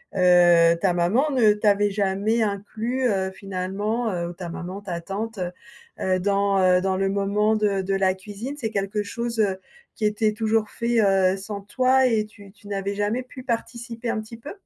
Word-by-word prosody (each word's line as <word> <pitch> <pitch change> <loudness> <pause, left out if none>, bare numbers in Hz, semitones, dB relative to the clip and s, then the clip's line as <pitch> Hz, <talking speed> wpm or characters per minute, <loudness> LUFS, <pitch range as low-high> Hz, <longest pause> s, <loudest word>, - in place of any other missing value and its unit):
heu, 175 -2 +6
ta 185 -3 +2
maman 220 - +2
ne 225 -6 +4
t'avait 205 -1 +2
jamais 205 +3 +1
inclus, 220 +5 -2
heu, 190 -1 0
finalement, 195 +4 -3
heu, 170 -1 -2
ou - - -7
ta 175 -1 -7
maman, 185 +4 -6
ta 175 -4 -5
tante, 205 +3 -5
heu, 180 -1 -2 0.5
heu, 185 0 +1
dans, 200 +1 +1
heu, 180 0 +5
dans 190 0 0
le 195 0 +1
moment 205 +2 +1
de 205 -2 +1
de 195 +1 -1
la 190 -1 +2
cuisine? 205 +8 -7
C'est 235 -6 -3
quelque 200 +1 -1
chose, 235 +2 -4
heu, 195 -3 +2 0.4
qui 215 - -2
était 210 +1 +1
toujours 220 -1 0
fait, 235 0 0
heu, 195 -1 +3
sans 200 +1 -6
toi 255 +5 +2
et 220 -3 +2
tu 200 -2 -15
tu 205 0 -18
n'avais 200 0 -2
jamais 210 +5 -1
pu 255 +1 -11
participer 235 -1 -4
un 220 -2 -2
petit 225 +1 -11
peu? 260 +6 -9
205 Hz, 190 wpm, -24 LUFS, 190-225 Hz, 0.5 s, heu